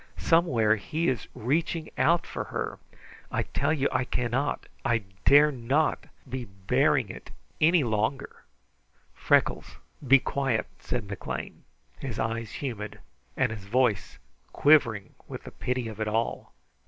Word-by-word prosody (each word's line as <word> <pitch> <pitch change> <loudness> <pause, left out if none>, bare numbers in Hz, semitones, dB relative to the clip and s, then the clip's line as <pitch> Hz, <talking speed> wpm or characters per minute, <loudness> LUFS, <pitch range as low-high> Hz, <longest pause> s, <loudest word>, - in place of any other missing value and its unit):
Somewhere 125 -11 +3
he 160 - -1
is 125 -3 -2
reaching 160 +6 -1
out 170 +1 +3
for - - -5
her! - - -4 0.5
I - - 0
tell - - -1
you 140 -3 +2
I - - +1
cannot, 125 +3 -1 0.2
I 115 -2 +1 0.2
dare 145 +2 +7
not 135 +4 0 0.2
be 130 -1 -4
bearing 95 -2 +1
it - - -9 0.3
longer!" 135 -7 +2 0.8
"Freckles, - - +1 0.3
be 140 +2 +8
quiet!" 135 -3 -1
said 120 -5 -3
McLean, 100 -1 -6 0.3
his 125 -5 -5
eyes 115 0 -2
humid 110 -7 -5 0.4
and 125 -3 +2
his 105 -3 -7
voice 120 -1 +1 0.3
quivering 115 -9 +3
with - - -7
the - - -9
pity 125 -2 -2
of 110 -1 -8
it 110 - -1
all. 110 +2 -2
125 Hz, 130 wpm, -27 LUFS, 110-145 Hz, 0.8 s, be